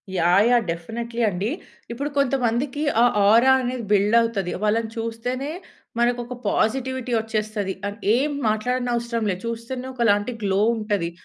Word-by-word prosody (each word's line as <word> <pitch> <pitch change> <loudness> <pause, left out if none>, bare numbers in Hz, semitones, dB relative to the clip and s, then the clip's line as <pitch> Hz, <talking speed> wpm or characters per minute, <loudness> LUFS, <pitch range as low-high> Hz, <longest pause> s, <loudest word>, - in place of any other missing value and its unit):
Yeah! 180 +4 +4
Yeah! 240 -2 +4
Definitely 230 +8 -4
అండి. 200 +3 -1 0.4
ఇప్పుడు 280 +5 -3
కొంతమందికి 265 +1 0 0.2
ఆ - - +7 0.3
ఆరా 235 +5 +6
అనేది 245 -2 -3
బిల్డవుతది. 210 -1 +2
వాళ్ళని 220 +1 +1
చూస్తేనే 240 +5 -3 0.5
మనకొక 240 +1 0
పాజిటివిటీ 260 +3 0
వచ్చేస్తది. 215 -3 -2 0.2
అన్ 205 - -9 0.2
ఏం 285 +4 +1 0.2
మాట్లాడనవసరం 235 +1 -1
లే. - - -1
చూస్తేనే 230 +3 -5
ఒకలాంటి 230 -2 +2
గ్లో 195 0 +1 0.2
ఉంటది. 205 -6 -1
230 Hz, 125 wpm, -23 LUFS, 210-250 Hz, 0.5 s, ఆ